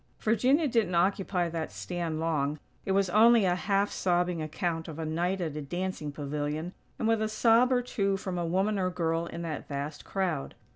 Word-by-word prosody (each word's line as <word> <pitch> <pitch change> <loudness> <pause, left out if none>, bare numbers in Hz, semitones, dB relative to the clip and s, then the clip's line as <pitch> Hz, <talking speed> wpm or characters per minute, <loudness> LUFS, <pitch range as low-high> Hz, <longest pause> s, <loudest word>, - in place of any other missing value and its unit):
Virginia 255 +8 +3
didn't 225 -8 +1
occupy 185 0 +1
that 165 -1 -4
stand 170 -3 -3
long; 155 -3 0 0.3
it - - -1
was 195 0 +3
only 225 +1 +6
a 180 - +3
half 195 +3 +1
sobbing 175 -2 0
account 160 +1 -2
of 160 -2 -7
a 160 - -3
night 175 +4 -1
at 160 -4 -3
a 150 - -3
dancing 175 0 -3
pavilion; 150 +4 -3 0.2
and 225 - -1
with 225 -1 +2
a 215 - 0
sob 230 +3 +4
or 250 -1 +2
two 200 -5 0
from 190 -1 -4
a - - -1
woman 190 +5 +1
or 185 -1 +1
girl 165 -1 -1
in 170 0 -6
that 160 -3 -5
vast 145 +1 -5
crowd. 180 -8 -2
180 Hz, 195 wpm, -29 LUFS, 160-200 Hz, 0.3 s, only